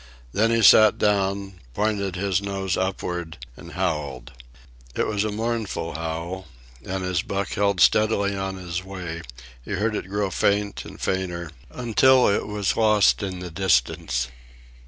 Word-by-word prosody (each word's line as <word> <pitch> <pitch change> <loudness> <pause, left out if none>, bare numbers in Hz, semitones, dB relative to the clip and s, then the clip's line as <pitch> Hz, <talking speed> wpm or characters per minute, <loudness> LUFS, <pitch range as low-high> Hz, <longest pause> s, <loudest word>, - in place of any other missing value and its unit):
Then 110 +3 +2
he 115 -1 +2
sat 110 +2 +7
down, 100 -2 0 0.2
pointed 100 -3 -1
his 95 0 0
nose 95 -2 -2
upward, 90 -3 -3 0.2
and - - -12
howled. 75 -9 -3 0.6
It - - +1
was 105 -1 0
a 110 - -2
mournful 110 -6 -3
howl, 85 +3 -5 0.4
and 95 +2 -3
as 90 -2 0
Buck 100 0 -3
held 100 -1 0
steadily 100 +1 +3
on 95 0 -3
his 90 -1 -5
way 90 -3 -6 0.4
he 100 - -5
heard 105 +3 0
it 95 - -5
grow 100 -1 -1
faint 100 +1 0
and - - -11
fainter 90 -3 -2 0.2
until 125 +2 +4
it 100 - +1
was 105 -2 -1
lost 105 -2 +4
in 95 -3 -4
the 90 -1 -6
distance. 60 -8 +1
95 Hz, 150 wpm, -24 LUFS, 90-105 Hz, 0.6 s, sat